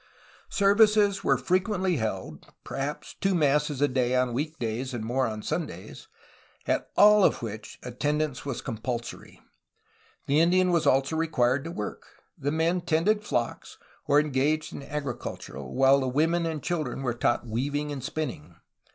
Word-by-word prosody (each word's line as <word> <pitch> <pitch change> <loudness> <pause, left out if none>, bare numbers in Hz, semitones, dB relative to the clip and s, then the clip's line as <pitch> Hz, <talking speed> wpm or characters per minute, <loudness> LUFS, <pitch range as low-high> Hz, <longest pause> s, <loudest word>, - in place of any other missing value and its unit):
Services 205 0 +4
were 135 - +3
frequently 185 - 0
held, 95 - -4
— - - -54
per - - -7
haps 145 +2 -4
two 195 -1 0
masses 150 -2 +1
a - - +5
day 125 -2 0
on 125 -1 +1
week 150 +5 -3
days 120 +3 -3
and 115 - -4
more 130 +3 0
on 110 -1 -5
Sundays, - - -5 0.6
at - - -1
all 210 0 +7
of - - +2
which 110 -1 -7
attendance 145 +3 -2
was 140 -4 -4
compulsory. 120 0 -5 0.9
The 145 +2 +2
Indian 180 +2 +4
was 165 -3 +2
also 135 +3 +2
required 135 -5 +1
to 165 - -5
work. 105 -11 -6 0.3
The 145 - -2
men 165 +3 +1
tended 175 +6 +1
flocks, 120 - -3 0.3
or 145 0 +5
engaged 150 +1 0
in - - -6
agriculture, 140 - -5
while 135 - +3
the 130 - -1
women 165 +6 +1
and 160 -3 -4
children 150 -7 -2
were 125 -2 0
taught 120 0 0
weav 125 +6 -2
ing 150 0 -2
and 135 -3 -5
spinning. 125 - -5
145 Hz, 160 wpm, -27 LUFS, 125-165 Hz, 0.9 s, all